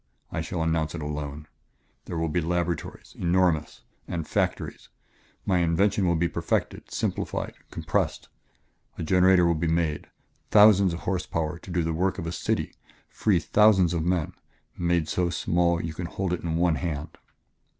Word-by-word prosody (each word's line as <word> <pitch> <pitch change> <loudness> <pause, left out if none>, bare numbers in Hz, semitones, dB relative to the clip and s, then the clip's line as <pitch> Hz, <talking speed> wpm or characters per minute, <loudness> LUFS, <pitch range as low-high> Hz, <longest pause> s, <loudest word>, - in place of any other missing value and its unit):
I - - -2
shall 85 -2 -3
announce 80 -1 0
it 85 - -5
alone.... 75 0 -5 0.6
There 85 - -5
will 80 - 0
be 80 +3 0
laboratories 85 0 -3
enormous! 85 -4 +1 0.2
and 85 -3 -4
factories. - - -2 0.6
My 95 -3 +2
invention 90 +3 +2
will 85 - +2
be 85 +1 +1
perfected, - - -2
simplified, - - -2 0.2
compressed. - - -2 0.7
A - - -4
generator 90 +1 +5
will 85 - +3
be 80 +1 -1
made 80 -2 0 0.4
thousands 100 -4 +6
of 85 - -8
horsepower 85 -3 -2
to - - -13
do 90 -1 0
the 80 0 -1
work 95 +4 0
of 90 - -4
a 85 - -3
city, - - -2 0.4
free 105 -4 +1
thousands 95 -1 +4
of 85 - 0
men 85 -2 0 0.4
made 85 -2 0
so 90 +2 0
small 85 +1 +1
you 80 -1 -4
can 85 +1 -5
hold 95 +1 -2
it 90 - -2
in 80 -2 -2
one 85 -1 +2
hand." 80 -2 -4
85 Hz, 160 wpm, -26 LUFS, 80-90 Hz, 0.7 s, thousands